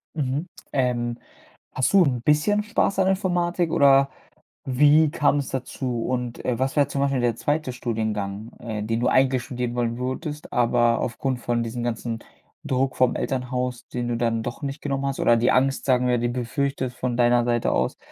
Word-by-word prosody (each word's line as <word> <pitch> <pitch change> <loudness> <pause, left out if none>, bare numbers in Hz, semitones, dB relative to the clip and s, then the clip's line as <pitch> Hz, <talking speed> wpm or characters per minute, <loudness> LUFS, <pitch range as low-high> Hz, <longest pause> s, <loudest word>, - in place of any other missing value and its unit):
Mhm. 145 +2 -2 0.3
Ähm. 120 -3 0 0.6
Hast 130 - 0
du 195 -2 +7
'n 125 -6 0
bisschen 155 - +2
Spaß 210 -2 0
an 190 - +3
Informatik 175 -3 0
oder 140 -2 +5 0.6
wie 145 +4 +5
kam 145 0 +2
es 140 - -3
dazu? 125 -2 -3
Und, 125 -2 -3
äh, 125 -2 -1
was 135 +1 -1
wär 145 -2 +3
zum 140 - -3
Beispiel 135 -2 +1
der 120 -2 +1
zweite 145 -2 -1
Studiengang, 110 -3 -3
äh, 110 -3 -4
den 115 +2 -1
du 125 - +1
eigentlich 130 -1 +3
studieren 125 -1 -4
wollen 120 -1 -1
würdest, 145 +4 -5
aber 120 -1 +3
aufgrund 125 +1 -2
von 120 -1 -1
diesem 115 +1 -4
ganzen 115 -1 -3 0.5
Druck 130 -2 0
vom 130 -1 +3
Elternhaus, 125 -1 -3
den 120 -1 -3
du 120 - -1
dann 115 -1 0
doch 120 +5 -6
nicht 140 +1 -4
genommen 140 -1 -2
hast 135 - -3
oder 120 0 +4
die 120 - +3
Angst, 135 +1 +1
sagen 125 -2 +2
wir, 125 0 +2
die 120 +1 0
befürchtet 130 +2 -2
von 125 -1 -3
deiner 120 0 +4
Seite 120 -1 +1
aus? - - 0
125 Hz, 185 wpm, -24 LUFS, 120-140 Hz, 0.6 s, du